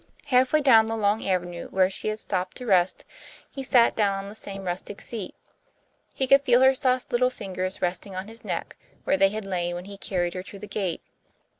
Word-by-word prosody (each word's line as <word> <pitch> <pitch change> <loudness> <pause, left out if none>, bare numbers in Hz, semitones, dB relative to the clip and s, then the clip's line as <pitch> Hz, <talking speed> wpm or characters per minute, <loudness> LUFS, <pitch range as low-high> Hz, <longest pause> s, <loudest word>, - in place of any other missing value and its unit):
Half 255 -2 +3
way 310 - +4
down 225 -6 +6
the 225 - -2
long 210 0 +1
avenue 175 -2 -2
where 190 -1 +3
she 195 - -3
had 215 0 -1
stopped 185 -3 -3
to 250 - -8
rest, 185 -4 +2 0.5
he 270 - -5
sat 245 -3 +4
down 200 -2 +2
on 195 0 -6
the - - -9
same 195 -2 -8
rustic 185 +2 -4
seat. 215 -6 -5 0.8
He 265 - 0
could 275 +1 +6
feel 250 -2 +4
her 265 0 +6
soft 255 -1 0
little 250 +1 +3
fingers 185 -6 -4
resting 185 +2 -2
on 185 +2 -5
his 225 +1 -11
neck, - - -4 0.3
where 285 - +2
they 195 - +5
had 215 0 -5
lain 175 -2 -2
when 175 +1 -6
he 200 0 -10
carried 175 -3 -1
her 185 - -4
to 200 +2 -11
the 205 - -8
gate. 195 -4 -3
200 Hz, 215 wpm, -25 LUFS, 185-240 Hz, 0.8 s, down